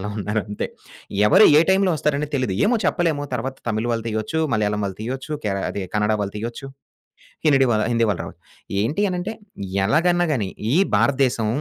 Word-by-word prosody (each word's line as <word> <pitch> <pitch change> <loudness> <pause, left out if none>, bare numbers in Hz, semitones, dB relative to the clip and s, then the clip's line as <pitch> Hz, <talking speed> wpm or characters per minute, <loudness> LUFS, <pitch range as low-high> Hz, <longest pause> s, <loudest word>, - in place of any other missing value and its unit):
అలా 105 +2 -4
ఉన్నారంతే. 105 0 -2 0.6
ఎవరు - - +7
ఏ - - +6
టైంలో 190 0 +3
వస్తారనేది 150 0 -1
తెలీదు 125 -7 -1
ఏమో 240 +3 +3
చెప్పలేము 160 -5 +1
తరువాత 130 +3 -3
తమిళ్ 110 +1 -1
వాళ్ళు 115 -1 -2
తీయొచ్చు, 110 +8 -2 0.2
మలయాళం 105 -1 0
వాళ్ళు 95 0 -6
తీయొచ్చు, 130 +5 -5
కేర 100 -2 0
అది 100 - -4
కన్నడ 105 +1 +2
వాళ్ళు 100 +1 -5
తీయొచ్చు. 120 +5 -6 0.8
హినడివా 135 -5 +4 0.2
హిందీవాల 115 -5 +1
రావచ్చు. - - -11 0.4
ఏంటి 145 - -1
అనంటే 180 +4 -3 0.6
ఎలాగన్నా 175 +5 +2
గాని 105 -7 -1 0.3
ఈ - - +5 0.2
భారత 140 -1 +2
దేశం 115 -4 -1
120 Hz, 160 wpm, -22 LUFS, 105-150 Hz, 0.8 s, ఎవరు